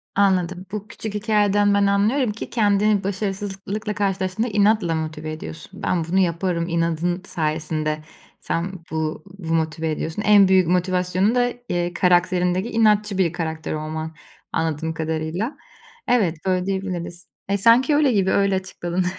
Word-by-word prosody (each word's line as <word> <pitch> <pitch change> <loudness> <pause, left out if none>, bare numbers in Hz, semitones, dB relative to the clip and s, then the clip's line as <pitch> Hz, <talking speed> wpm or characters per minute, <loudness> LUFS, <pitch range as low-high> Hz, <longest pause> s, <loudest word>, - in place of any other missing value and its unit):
Anladım. 185 -2 +1
Bu 210 0 -5
küçük 215 -1 -7
hikâyeden 205 -1 +2
ben 200 0 +3
anlıyorum 210 +5 +2
ki 210 - -7
kendini 210 -2 +2
başarısızlıkla 200 +1 -3
karşılaştığında 195 +2 -1
inatla 205 -5 +2
motive 155 -1 -4
ediyorsun. 160 +4 -9
Ben 175 -2 +1
bunu 180 +4 +1
yaparım, 170 -1 0
inadın 170 +1 0
sayesinde 155 -2 -2 0.4
sen 170 +3 -2 0.2
bu 160 0 -2 0.2
bu 165 -3 -3
motive 160 0 0
ediyorsun. 160 +5 -3
En 205 -2 +6
büyük 185 -2 +4
motivasyonu 180 +4 +1
da, 245 -1 +2 0.2
eee, 175 0 -1
karakterindeki 180 +2 +2
inatçı 210 -3 +2
bir 175 -4 +2
karakter 160 -2 -3
olman 155 +1 -4 0.4
anladığım 160 0 -1
kadarıyla. 160 - -3 0.5
Evet, 205 -9 +2
böyle 185 -1 +1
diyebiliriz. 185 -3 -4 0.2
E, 200 - +2
sanki 235 - +5
öyle 290 -3 +4
gibi, 195 -4 +2
öyle 200 -1 +2
açıkladın. 185 -1 -3
185 Hz, 140 wpm, -22 LUFS, 165-205 Hz, 0.5 s, En